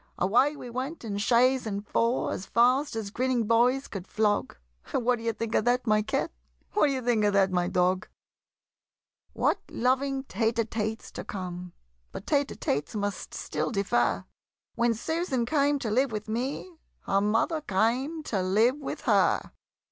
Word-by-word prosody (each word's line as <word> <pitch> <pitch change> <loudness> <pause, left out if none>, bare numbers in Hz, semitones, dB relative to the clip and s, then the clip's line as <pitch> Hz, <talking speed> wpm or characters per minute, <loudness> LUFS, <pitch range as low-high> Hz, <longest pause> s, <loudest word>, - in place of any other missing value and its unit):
Away 245 +11 +3
we 250 -4 -8
went 260 +3 -4
in 200 -2 -3
chaise 250 +3 +3
and 200 0 -4
four, 235 +2 +1
As 190 - -5
fast 250 +4 +3
as 215 -3 -4
grinning 250 0 0
boys 245 +5 +3
could 190 -2 -7
flog 210 - 0 0.4
What 245 0 +2
d'ye 230 0 -1
think 225 0 -4
of - - +3
that, 245 +1 +2
my 215 -2 +3
Cat? 210 - -1 0.4
What - - +4
d'ye 270 -2 -1
think 235 -3 +1
of 205 -1 +3
that, 195 -1 +3
my 175 -1 +1
Dog? 180 +1 +1 1.3
What - - +1
loving 265 +2 0
tête 225 -2 0
à 230 -1 +1
têtes 220 0 -4
to - - -6
come! 180 -2 -6 0.4
But - - -8
tête 285 -2 +2
à - - -9
têtes 145 +9 -2
must 205 -2 -3
still - - -2
defer! 120 - +1 0.5
When 235 0 +1
Susan 280 - -1
came 285 +2 +2
to 230 -6 -3
live 260 +3 +2
with 215 0 -4
me, 270 +9 -4 0.2
Her 195 0 +1
mother 225 +10 +1
came 255 - 0
to 200 -9 -1
live 215 +8 +3
with 285 - -5
her! - - +2
230 Hz, 170 wpm, -28 LUFS, 205-260 Hz, 1.3 s, What